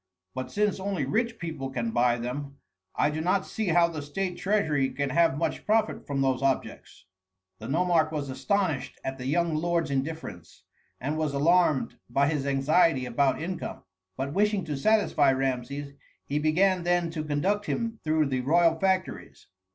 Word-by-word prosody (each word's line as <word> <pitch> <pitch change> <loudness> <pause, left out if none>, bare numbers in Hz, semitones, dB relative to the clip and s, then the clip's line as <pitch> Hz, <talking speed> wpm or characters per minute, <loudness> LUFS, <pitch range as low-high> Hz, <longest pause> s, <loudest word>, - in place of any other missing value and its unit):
But 130 - -5
since 205 -1 0
only 190 -6 -2
rich 230 - -1
people 155 -8 -5
can 120 -3 -2
buy 120 +1 +2
them, 140 +4 -5 0.4
I 150 - +2
do 155 +1 -3
not 185 +3 +1
see 220 -2 -3
how 170 0 +4
the 160 -3 -5
state 180 +6 -3
treasury 160 -11 +1
can 140 0 -2
have 165 -2 +3
much 165 - -2
profit 215 0 0
from 140 -1 -1
those 130 -1 +1
objects." 135 -7 -2 0.5
The 110 - -7
nomarch 165 +1 +2
was 150 -3 -3
astonished 160 +1 -1
at 135 0 -4
the 125 - -5
young 170 +3 +1
lord's 165 -1 0
indifference, 135 - -5 0.4
and 145 +5 -2
was 150 -3 -1
alarmed 165 -1 +2
by 140 +4 +2
his 145 -3 -1
anxiety 140 0 +3
about 130 +3 +1
income; 180 +1 -5 0.3
but 140 +2 -3
wishing 205 -1 +1
to 150 -3 -3
satisfy 180 -3 +3
Rameses, 135 +2 -3 0.3
he 145 +1 -1
began 180 +5 +2
then 175 -1 +1
to 160 -2 -4
conduct 180 +8 -1
him 230 -1 -2
through 155 0 +2
the 130 -2 -1
royal 165 +4 +3
factories. 190 0 -1
155 Hz, 165 wpm, -27 LUFS, 135-180 Hz, 0.5 s, how